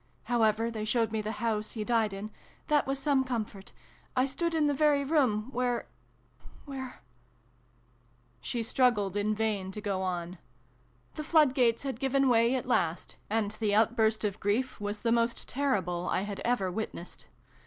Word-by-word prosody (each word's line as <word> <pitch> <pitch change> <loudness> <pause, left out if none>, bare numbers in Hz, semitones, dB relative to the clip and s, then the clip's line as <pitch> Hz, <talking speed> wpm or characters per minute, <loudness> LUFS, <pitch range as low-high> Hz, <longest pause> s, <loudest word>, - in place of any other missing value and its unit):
However, 225 -1 +2
they 220 -2 -4
showed 225 +1 +1
me 220 -1 -1
the 215 +1 -3
house 215 -1 -1
he 220 - -3
died 225 -2 +1
in: 200 +2 -6 0.4
that 295 -2 +3
was 270 0 0
some 275 -1 +2
comfort. 215 -6 -4 0.4
I 255 0 +3
stood 330 +5 -1
in 310 -2 +3
the 290 - +2
very 290 0 +3
room 260 -7 +1
where 245 -1 -1 0.8
where 265 -3 -7 0.7
." 120 0 -36
She 240 - -2
strug 250 +2 +3
gled 200 -2 -3
in 210 +1 +1
vain 210 -3 -1
to 210 - -5
go 200 -2 -2
on. 180 -1 -3 0.8
The 305 - -3
flood 305 -4 +4
gates 240 -3 +2
had 265 -4 -4
given 270 0 +2
way 235 +1 +4
at 255 - -2
last, 170 -9 0
and 215 -1 0
the 215 -1 0
outburst 220 0 +3
of 210 -1 -2
grief 230 +6 0
was 205 0 -3
the 230 - +1
most 235 0 +1
terrible 185 -11 -1
I 185 - +1
had 200 0 -5
ever 230 -6 0
witnessed. 180 -3 -6
225 Hz, 175 wpm, -30 LUFS, 205-255 Hz, 0.8 s, flood